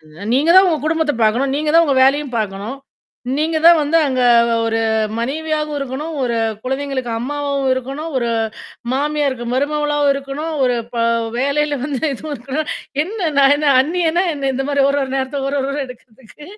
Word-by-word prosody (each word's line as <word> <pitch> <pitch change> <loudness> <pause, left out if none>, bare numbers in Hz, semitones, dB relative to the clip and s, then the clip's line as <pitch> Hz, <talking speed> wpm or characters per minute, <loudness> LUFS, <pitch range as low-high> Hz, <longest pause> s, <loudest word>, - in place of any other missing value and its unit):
அ. - - -28 0.3
நீங்கதான் 335 +8 +5
உங்க 315 -3 +1
குடும்பத்த 320 -1 +1
பாக்கணும். 245 +5 +2
நீங்கதான் 310 +3 +3
உங்க 275 -2 +1
வேலையும் 275 -1 +1
பாக்கணும். 210 +5 -4 0.6
நீங்க 315 +2 0
தான் 340 0 +8
வந்து 300 +2 +1
அங்கே 255 -2 0 0.4
ஒரு 225 0 0 0.4
மனைவியாகவும் 305 +4 -2
இருக்கணும். 280 +4 -5
ஒரு 235 -2 -1 0.3
குழந்தைங்களுக்கு 265 -1 -3
அம்மாவாவும் 280 +2 -2
இருக்கணும். 270 +5 -5
ஒரு 235 -2 -1 0.6
மாமியாருக்கு 280 -3 -1
மருமகளாவும் 295 +1 +1
இருக்கணும். 275 +3 -5
ஒரு 250 -1 +1 0.2
ப - - -4 0.4
வேலையில 285 +2 0
வந்து 280 -2 -3
இதுவும் 300 +3 -6
இருக்கணும். 270 +6 -4 0.4
"என்ன? 375 -3 -3
நான் 275 0 +6
என்ன 295 0 0
அன்னியனா 340 +3 0
என்னா?" 275 -1 -2
இந்த 270 +1 -2
மாரி 280 -1 +2
ஒரு, 285 - 0
ஒரு 265 - -7
நேரத்தில 270 +1 -2
ஒரு, 285 - -2
ஒரு 270 - -2
வேடம் 280 -1 -3
எடுக்கிறதுக்கு. 250 +2 -15
280 Hz, 160 wpm, -18 LUFS, 260-300 Hz, 0.6 s, தான்